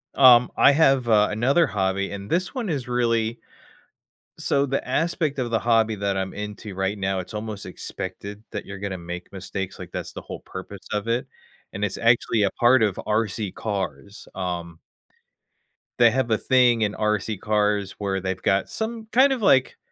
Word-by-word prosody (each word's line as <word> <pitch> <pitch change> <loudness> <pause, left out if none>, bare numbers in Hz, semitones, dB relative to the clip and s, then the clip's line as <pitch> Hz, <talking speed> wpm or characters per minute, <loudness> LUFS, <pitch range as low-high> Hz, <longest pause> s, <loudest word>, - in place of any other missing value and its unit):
Um, 125 -2 +7
I - - +7
have, 135 -4 +3
uh, 105 -2 +4
another 135 +10 +3
hobby, 100 -2 -1
and 100 0 -7
this 180 +2 0
one 240 -6 -3
is 135 -6 -2
really 115 -2 0 1.0
so 140 0 +1
the 135 -1 -2
aspect 155 0 0
of 125 -2 -1
the 115 - +1
hobby 115 -1 +2
that 100 -1 -1
I'm 95 0 -3
into 105 -1 -7
right 95 +2 -1
now, 95 -1 -1
it's 90 +4 -7
almost 105 -1 -5
expected 100 +3 -7
that 105 - -5
you're 100 - -7
gonna 100 -1 -4
make 90 +2 -7
mistakes, 95 0 -5
like, 90 -2 -9
that's - - -5
the - - -7
whole - - -8
purpose 95 +1 -9
of 105 +1 -2
it, 120 +4 0 0.5
and 100 - -4
it's 105 -2 -1
actually 115 -2 +3
a 100 - +2
part 120 0 +4
of 105 -4 0
RC 105 -2 0
cars, 100 -1 -5
um 85 -3 -4 1.2
They 120 -1 +7
have 120 -2 0
a 110 - +4
thing 125 -3 +3
in 105 -1 +1
RC 105 -1 -1
cars 105 -2 0
where 100 -2 -2
they've 95 0 -3
got 95 0 +1
some, 220 0 -4
kind 265 +3 +5
of, 255 - -4
like 130 -10 +3
105 Hz, 180 wpm, -24 LUFS, 100-125 Hz, 1.2 s, Um